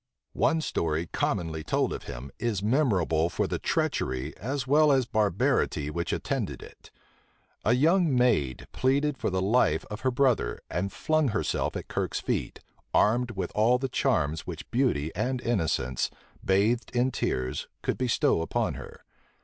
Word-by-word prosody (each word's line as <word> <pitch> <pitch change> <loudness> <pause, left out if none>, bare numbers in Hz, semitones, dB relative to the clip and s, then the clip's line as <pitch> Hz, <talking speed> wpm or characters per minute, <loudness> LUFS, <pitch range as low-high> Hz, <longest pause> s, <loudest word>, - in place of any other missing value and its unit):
One 160 - +2
story, 80 - -1
commonly 80 -2 -2
told - - 0
of - - -7
him, 65 +3 -7
is 110 -5 -1
memorable 100 - +2
for - - -1
the - - -2
treachery, 65 0 -1
as 130 +4 -3
well 150 +2 +5
as 135 -2 +3
barbarity, 100 - +1
which 85 +2 -2
attended - - -2
it. - - -15 0.7
A 115 - +3
young 160 +3 +3
maid 105 - +2
pleaded 140 +3 +1
for - - 0
the 95 -1 -1
life 100 -7 +2
of 105 - -5
her 130 - +2
brother, 125 -3 +1
and 95 +3 -1
flung 155 -2 +1
herself 110 - -1
at - - -7
Kirke's - - -2
feet, - - -3 0.3
armed 120 +3 +3
with 95 -2 -2
all 115 +4 +4
the 135 +1 -3
charms 80 - 0
which 85 -3 -7
beauty 115 - +1
and 125 +6 -1
innocence, 80 - 0 0.3
bathed 105 +6 +2
in 125 +2 +2
tears, 65 - -2 0.2
could - - -1
bestow 125 -9 +2
upon 80 - -1
her. - - -10
110 Hz, 155 wpm, -28 LUFS, 85-130 Hz, 0.7 s, well